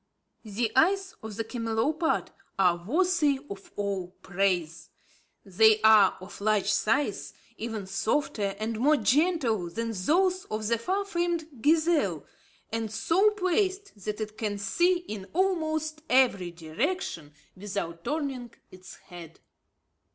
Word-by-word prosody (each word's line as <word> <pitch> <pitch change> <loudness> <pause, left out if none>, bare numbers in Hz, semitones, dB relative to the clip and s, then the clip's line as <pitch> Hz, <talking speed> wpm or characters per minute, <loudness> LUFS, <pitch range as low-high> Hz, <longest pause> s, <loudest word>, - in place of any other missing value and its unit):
The 220 +2 -2
eyes 380 +7 +3
of 220 -1 -7
the 225 - -2
camelopard 235 +8 -1 0.3
are 175 -3 +2
worthy 315 - +2
of 195 0 -9
all 200 -3 -2 0.2
praise. 180 -4 -1 0.6
They 215 +3 +5
are 215 -3 +6
of 185 +2 -11
large 210 -1 +2
size, 245 +8 0 0.2
even 220 -3 -4
softer 200 0 -1
and 220 +1 -3
more 295 +5 +4
gentle 250 - +1
than 230 +5 -3
those 360 - +1
of 215 0 -4
the 235 -1 +1
far 385 - -1
famed 340 - -3
gazelle, 305 - +2 0.5
and 225 -1 -3
so 330 - +3
placed 385 - -1
that 210 +1 -4
it 215 0 -6
can 210 -2 -2
see 345 - +2
in 210 - -7
almost 315 -4 0
every 245 -9 +3
direction 170 - -3 0.2
without 185 -4 -5
turning 275 - -3 0.2
its 185 0 -12
head. 170 -3 -12
225 Hz, 125 wpm, -28 LUFS, 200-315 Hz, 0.6 s, are